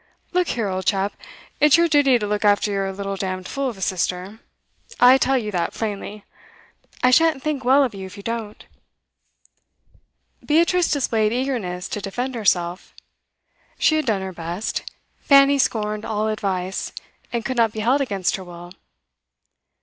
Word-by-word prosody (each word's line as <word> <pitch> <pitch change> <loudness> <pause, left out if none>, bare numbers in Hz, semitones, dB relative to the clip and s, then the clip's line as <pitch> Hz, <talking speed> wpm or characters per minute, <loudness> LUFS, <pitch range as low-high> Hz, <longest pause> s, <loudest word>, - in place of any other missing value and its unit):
'Look 360 -1 +2
here, 225 -3 0
old 185 -1 -3
chap, 195 0 +1 0.5
it's 300 +1 +6
your 340 0 +4
duty 285 -5 +4
to 210 - -3
look 210 +1 -2
after 205 0 +3
your 195 -1 -1
little 195 0 -4
damned 185 -1 -4
fool 275 -1 -2
of 230 - -8
a - - -12
sister; 185 +3 -2 0.6
I 255 +2 +7
tell 265 0 +2
you 215 -4 -3
that 175 -3 -2
plainly. 210 -1 -5 0.8
I 250 - +5
shan't 315 0 +3
think 300 -4 -2
well 270 +3 +5
of 250 -4 -2
you 190 -1 -7
if 195 +3 -13
you 200 - -10
don't.' 225 -2 -5 1.8
Beatrice 340 +3 +2
displayed 225 -6 +1
eagerness 230 -8 -2
to 210 - -4
defend 245 +7 -4
herself. 180 -6 -1 0.8
She 310 - +3
had 310 -3 -1
done 200 -4 0
her 190 0 -6
best; 170 +5 -4 0.4
Fanny 280 -1 +5
scorned 215 -4 0
all 215 0 -1
advice, 190 -3 -3 0.4
and 235 -2 -3
could 260 -2 -3
not 230 -2 +3
be 220 - -5
held 255 +6 +2
against 200 -8 -1
her 190 - -8
will. 175 0 -11
215 Hz, 165 wpm, -22 LUFS, 195-265 Hz, 1.8 s, I